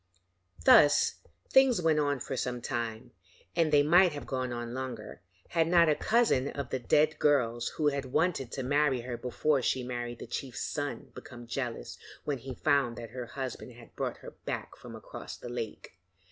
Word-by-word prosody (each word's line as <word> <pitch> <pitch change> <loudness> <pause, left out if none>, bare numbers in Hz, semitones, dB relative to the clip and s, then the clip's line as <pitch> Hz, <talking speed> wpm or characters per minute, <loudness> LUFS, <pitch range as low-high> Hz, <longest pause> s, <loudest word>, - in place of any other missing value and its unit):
Thus 145 0 +6 0.3
things 265 -5 +5
went 160 -3 +3
on 145 -2 +1
for 135 - -4
some 125 -1 -2
time, 120 0 -4 0.4
and 165 -2 +2
they 145 -1 +6
might 175 +3 +5
have 145 - -6
gone 130 -1 -2
on 120 0 -4
longer, 125 -7 -6 0.3
had 165 -1 +2
not 170 -1 +5
a - - +5
cousin 215 - +2
of 140 -3 -5
the 130 - -1
dead 150 +5 +2
girl's 120 -5 +2
who 150 -2 +3
had 140 -1 -3
wanted 135 -1 0
to 135 - -3
marry 140 -1 +2
her 120 0 -5
before 135 +4 0
she 130 +1 0
married 120 -1 -4
the - - -8
chief's 130 -3 -5
son 145 -1 -4
become 120 -1 -10
jealous 120 - -4 0.3
when 140 -3 -1
he 130 +1 -7
found 140 -6 +1
that 115 -1 -8
her 125 -2 -6
husband 130 -1 -6
had 115 0 -16
brought - - -3
her - - -7
back - - -4
from - - -11
across - - -9
the 120 - -8
lake. 120 -3 -6
130 Hz, 185 wpm, -30 LUFS, 120-150 Hz, 0.4 s, Thus